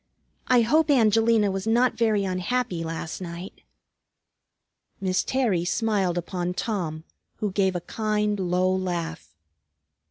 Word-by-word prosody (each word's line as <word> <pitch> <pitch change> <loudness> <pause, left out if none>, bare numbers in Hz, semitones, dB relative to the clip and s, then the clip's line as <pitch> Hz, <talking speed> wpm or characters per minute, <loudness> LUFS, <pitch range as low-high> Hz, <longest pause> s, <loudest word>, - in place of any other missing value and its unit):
I 250 -1 +5
hope 305 +7 +3
Angelina 225 -4 +4
was 195 +2 -4
not 240 +3 +3
very 220 -3 +2
unhappy 185 0 -1
last 165 +1 -5
night." 175 +1 -8 1.4
Miss 190 -1 0
Terry 230 -10 +1
smiled 195 -2 0
upon 175 0 -3
Tom, 170 -9 -3 0.3
who 210 -2 -2
gave 190 -1 +1
a 175 - -2
kind, 210 +1 -1
low 185 0 +1
laugh. 170 - -4
195 Hz, 120 wpm, -25 LUFS, 175-225 Hz, 1.4 s, I